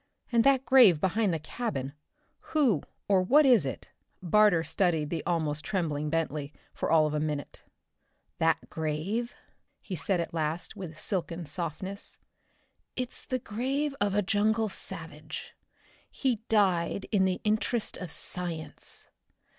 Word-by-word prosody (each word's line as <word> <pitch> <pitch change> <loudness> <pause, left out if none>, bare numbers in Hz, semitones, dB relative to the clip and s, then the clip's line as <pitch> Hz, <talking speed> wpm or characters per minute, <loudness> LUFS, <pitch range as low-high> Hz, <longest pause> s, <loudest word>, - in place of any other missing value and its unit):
And 235 -1 +4
that 270 0 +4
grave 235 - +7
behind 190 +4 +1
the 165 - 0
cabin, 155 - -4 0.6
who 245 - +4 0.3
or 195 -2 +4
what 285 +11 +5
is 235 - +5
it?" 130 - -6 0.3
Barter 190 -1 +4
studied 160 -2 +1
the 165 -2 -2
almost 155 -4 0
trembling 155 -7 -1
Bentley 155 -2 -2 0.2
for - - -2
all 160 -1 +5
of 150 - -1
a 150 - 0
minute. 150 -2 -3 0.8
"That 165 0 +2
grave?" 165 +10 -2 0.4
he 190 - -6
said 180 +3 0
at 170 - -3
last, 160 +1 -2
with 165 -5 -8
silken 170 -3 -1
softness. 175 +5 -5 0.8
"It's 255 -1 -3
the 255 - 0
grave 270 +6 -2
of 200 -1 +2
a 205 - +3
jungle 215 +2 +2
savage. - - -6 0.6
He 260 -4 0
died 195 -3 +2
in 195 -4 +4
the 185 -1 0
interest 215 +2 0
of 180 - -6
science. 170 0 -5
185 Hz, 140 wpm, -29 LUFS, 160-220 Hz, 0.8 s, grave